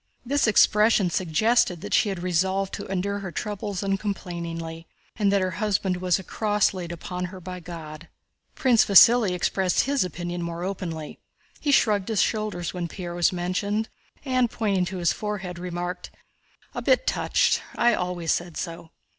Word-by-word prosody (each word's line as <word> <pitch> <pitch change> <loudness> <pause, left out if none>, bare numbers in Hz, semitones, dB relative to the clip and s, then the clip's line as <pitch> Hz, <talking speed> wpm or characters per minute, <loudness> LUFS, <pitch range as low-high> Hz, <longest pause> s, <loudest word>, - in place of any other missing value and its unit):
This 280 0 +2
expression 210 -3 +4
suggested 180 +1 +2
that - - -5
she 210 - +3
had 185 -3 -4
resolved 190 +2 0
to 200 - -5
endure 195 +1 -2
her 195 -3 -6
troubles 205 0 -4
uncomplainingly 170 -4 -4 0.3
and 205 -2 +2
that 200 -1 +3
her 185 - -1
husband 195 -3 0
was 180 -1 +1
a 190 - -8
cross 210 +1 +1
laid 175 -2 -5
upon 180 +1 -5
her 185 +1 -8
by 180 0 -7
God. 165 -2 -9 0.5
Prince 245 -4 +4
Vasíli 225 +2 +7
expressed 180 +1 +1
his 280 -2 +1
opinion 175 0 -4
more 170 0 -4
openly. 175 -5 -5 0.4
He 290 - 0
shrugged 210 -7 +3
his 220 -3 0
shoulders 215 -5 -2
when 175 -2 -3
Pierre 175 +1 -6
was 175 -1 +2
mentioned 195 +5 -2 0.4
and, 255 -2 +2
pointing 200 -6 0
to 190 +1 -5
his 170 -2 +2
forehead, 190 -4 -5
remarked: 175 0 -5 0.6
"A - - -4
bit - - +3
touched—I 240 0 +1
always 180 -2 -1
said 175 -2 -2
so." 165 -1 -6
185 Hz, 160 wpm, -25 LUFS, 175-210 Hz, 0.6 s, Vasíli